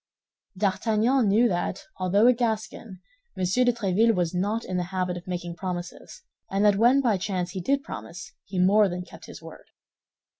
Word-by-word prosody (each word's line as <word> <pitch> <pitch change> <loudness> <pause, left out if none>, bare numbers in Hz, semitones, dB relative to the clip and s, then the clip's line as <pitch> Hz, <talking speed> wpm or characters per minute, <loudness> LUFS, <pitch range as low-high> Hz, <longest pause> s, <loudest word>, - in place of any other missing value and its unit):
D'Artagnan 220 +5 +1
knew 220 +5 +4
that, 175 +8 -2
although 190 +4 +2
a 250 - +7
Gascon, 220 -4 -4 0.4
M. 185 - -2
de 245 +7 +3
Tréville 225 0 +1
was 175 -2 -1
not 205 +6 -1
in 185 - -3
the 180 - -1
habit 180 -1 -2
of 175 0 -9
making 175 -1 -5
promises, 180 - -7 0.3
and 195 +2 +1
that 205 -1 +4
when 245 +6 +4
by 230 -6 +2
chance 185 -2 -3
he 185 - -5
did 275 +9 0
promise, 180 -6 -9
he 195 - -7
more 200 +3 +4
than 180 0 -5
kept - - -14
his - - -11
word. - - -12
195 Hz, 180 wpm, -25 LUFS, 180-225 Hz, 0.4 s, a